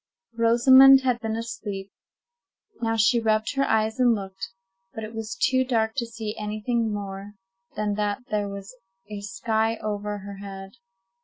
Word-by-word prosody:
Rosamond 260 +4 +7
had 250 -2 0
been 220 -1 -3
asleep. 210 -4 -5 0.9
Now 225 -1 0
she 225 +3 +4
rubbed 220 0 +1
her 275 0 +1
eyes 220 +2 +1
and 245 -2 +4
looked, 195 -2 -6 0.5
but 220 - -5
it 215 +1 -7
was 225 +1 -5
too 260 -2 +3
dark 225 -3 0
to 235 -3 -1
see 225 -2 -6
any 210 0 -4
thing 235 -2 0
more 200 0 -6 0.4
than 210 -1 -1
that 210 +3 -1
there 205 -1 0
was 200 +4 -8 0.4
a 205 -1 -5
sky 220 +3 -1
over 210 -1 -3
her 200 0 -9
head. 195 -1 -8
220 Hz, 160 wpm, -25 LUFS, 205-235 Hz, 0.9 s, Rosamond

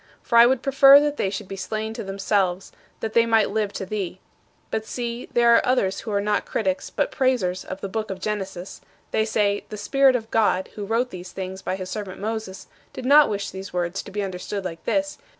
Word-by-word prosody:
For 235 - +4
I 235 - +9
would 260 0 +1
prefer 275 +1 +8
that 295 0 -1
they 195 - 0
should 195 0 -5
be 195 - -6
slain 215 +3 -4
to - - -6
themselves, 195 -1 -1 0.3
that 220 -1 -3
they 230 0 +4
might 225 -3 +3
live 210 -1 -1
to 190 - -4
thee. 190 -2 -4 0.5
But 220 - -1
see, 235 +1 -5
there 235 0 +5
are - - +4
others 220 -7 +1
who 220 - -6
are 200 - +1
not 210 +1 0
critics 190 -4 -2
but - - -1
praisers 245 -10 0
of 185 - -7
the - - -3
book 215 +2 -4
of 190 -1 -5
Genesis; 190 -2 -5 0.3
they 220 - +1
say: 205 -2 +1
"The 210 - -6
Spirit 265 +5 +3
of 225 -2 -4
God 210 -4 +2
who 205 - -5
wrote 235 +3 0
these 180 0 -8
things 190 0 -6
by 185 - -2
his 185 -1 -6
servant 200 -3 -5
Moses 215 -2 -4 0.3
did 255 - -7
not 290 +3 +7
wish 200 -1 -3
these 190 0 -8
words 175 +1 -2
to - - -11
be 205 +1 -3
understood 190 +1 -5
like 165 -2 -6
this. 295 0 -1
210 Hz, 220 wpm, -23 LUFS, 190-230 Hz, 0.5 s, I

